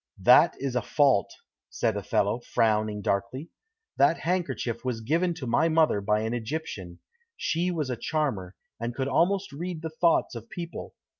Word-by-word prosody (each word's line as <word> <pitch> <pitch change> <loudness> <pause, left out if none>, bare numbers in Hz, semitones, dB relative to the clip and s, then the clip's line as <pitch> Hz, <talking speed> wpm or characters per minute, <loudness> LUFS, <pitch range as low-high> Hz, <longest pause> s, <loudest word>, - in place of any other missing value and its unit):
"That 145 - +7
is 135 -2 -3
a 125 - +2
fault," 135 -3 +2 0.4
said 110 -3 -1
Othello, 100 +2 0
frowning 110 -3 0
darkly. 125 +11 -2 0.5
"That 140 +4 +5
handkerchief 145 -9 -2
was 125 -3 -2
given 165 +8 0
to 155 -6 -6
my 155 +7 +2
mother 160 -10 +3
by 105 +1 +1
an 110 +1 -2
Egyptian. 110 - -5 0.4
She 170 +3 0
was 155 -7 -2
a - - -1
charmer, 120 - -2 0.2
and 120 +1 -4
could 135 -1 -1
almost 190 +6 +1
read 165 +3 -5
the 160 - -4
thoughts 165 +1 +2
of 115 -1 -9
people. 170 -1 -7
130 Hz, 160 wpm, -27 LUFS, 110-160 Hz, 0.5 s, That